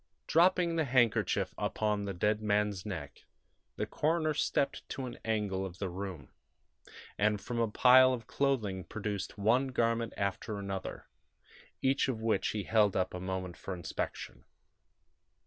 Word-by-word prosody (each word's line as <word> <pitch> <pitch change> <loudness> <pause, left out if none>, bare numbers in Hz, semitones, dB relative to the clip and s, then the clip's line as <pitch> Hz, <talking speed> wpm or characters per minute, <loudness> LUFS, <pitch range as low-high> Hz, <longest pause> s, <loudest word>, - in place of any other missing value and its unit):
Dropping 170 0 +3
the 160 - +2
handkerchief 125 -4 +2
upon 105 -1 0
the 100 - -3
dead 105 +4 +1
man's 105 -2 0
neck, 80 -8 -7 0.5
the - - -2
coroner 155 0 0
stepped 140 -1 -1
to 135 - -4
an 120 -1 -8
angle 105 -4 -1
of 95 -2 -6
the 95 -1 -3
room, 90 -6 -6 0.9
and 105 0 +2
from 120 +3 -4
a 115 - +2
pile 130 +4 +7
of 120 -3 -3
clothing 110 -10 0
produced 105 +3 -4
one 120 +7 +3
garment 115 -2 0
after 100 +1 -2
another, 100 -1 -5 0.8
each 135 +1 +2
of 125 -4 -2
which 110 0 +1
he 105 -2 -2
held 105 -2 +3
up 95 0 0
a 90 - -4
moment 95 -1 -4
for 95 - -5
inspection. 85 -2 -5
105 Hz, 145 wpm, -32 LUFS, 95-125 Hz, 0.9 s, pile